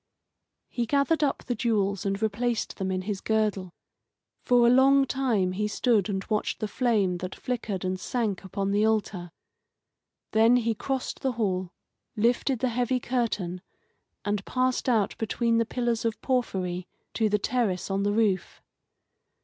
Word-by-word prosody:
He 240 Hz, -2 st, -3 dB
gathered 290 Hz, +4 st, +2 dB
up 280 Hz, -, 0 dB
the 245 Hz, -, -2 dB
jewels 205 Hz, -4 st, 0 dB
and 195 Hz, 0 st, -1 dB
replaced 225 Hz, +2 st, -1 dB
them 190 Hz, -1 st, -2 dB
in 185 Hz, 0 st, -2 dB
his 200 Hz, -1 st, -3 dB
girdle. 210 Hz, -5 st, 0 dB, 0.7 s
For 245 Hz, -1 st, +4 dB
a -, -, +6 dB
long 270 Hz, +2 st, +5 dB
time 240 Hz, -9 st, 0 dB
he 210 Hz, +3 st, -1 dB
stood 215 Hz, -2 st, +1 dB
and 190 Hz, -1 st, -2 dB
watched 215 Hz, -2 st, -1 dB
the 215 Hz, -, -2 dB
flame 210 Hz, -6 st, +1 dB
that 185 Hz, +1 st, -6 dB
flickered 215 Hz, -7 st, -3 dB
and 185 Hz, 0 st, -2 dB
sank 215 Hz, -4 st, -2 dB
upon 195 Hz, +1 st, -2 dB
the 205 Hz, +1 st, +2 dB
altar. 210 Hz, -5 st, 0 dB, 1.0 s
Then 225 Hz, +2 st, +5 dB
he 230 Hz, -2 st, +2 dB
crossed 265 Hz, +4 st, -3 dB
the 265 Hz, -2 st, -1 dB
hall, 185 Hz, -5 st, -1 dB, 0.4 s
lifted 245 Hz, +4 st, +1 dB
the 255 Hz, -, +2 dB
heavy 245 Hz, +2 st, 0 dB
curtain, 215 Hz, -8 st, -2 dB, 0.6 s
and 205 Hz, -1 st, -1 dB
passed 255 Hz, +2 st, 0 dB
out 215 Hz, -5 st, +2 dB
between 230 Hz, +1 st, +1 dB
the 230 Hz, -, +1 dB
pillars 240 Hz, -2 st, -1 dB
of 225 Hz, -2 st, -1 dB
porphyry 185 Hz, -9 st, -1 dB, 0.3 s
to 220 Hz, -2 st, +1 dB
the 210 Hz, -, +2 dB
terrace 205 Hz, -4 st, -1 dB
on 195 Hz, 0 st, 0 dB
the 205 Hz, +1 st, +1 dB
roof. 205 Hz, -4 st, 0 dB
220 Hz, 155 wpm, -27 LUFS, 195-245 Hz, 1.0 s, a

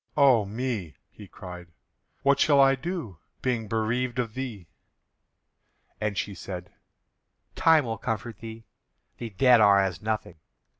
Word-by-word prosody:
"O 130 Hz, -7 st, +5 dB
me!" 105 Hz, -, -4 dB, 0.2 s
he 105 Hz, -, -13 dB
cried, 90 Hz, -1 st, -10 dB, 0.6 s
"what 140 Hz, 0 st, +3 dB
shall 145 Hz, -1 st, +4 dB
I 135 Hz, 0 st, +6 dB
do, 135 Hz, -, -5 dB, 0.2 s
being 120 Hz, -4 st, -1 dB
bereaved 120 Hz, +3 st, -1 dB
of 115 Hz, -3 st, -2 dB
thee?" 115 Hz, -9 st, -6 dB, 1.3 s
And 105 Hz, -2 st, -2 dB
she 100 Hz, -, -2 dB
said: 90 Hz, 0 st, -8 dB, 0.8 s
"Time 160 Hz, -4 st, +4 dB
will 115 Hz, -2 st, -4 dB
comfort 110 Hz, 0 st, -4 dB
thee; 115 Hz, 0 st, -9 dB, 0.5 s
the 115 Hz, -, -5 dB
dead 120 Hz, +3 st, +5 dB
are 100 Hz, -1 st, +6 dB
as 95 Hz, -3 st, -1 dB
nothing." 105 Hz, -6 st, -3 dB
110 Hz, 135 wpm, -26 LUFS, 100-130 Hz, 1.3 s, I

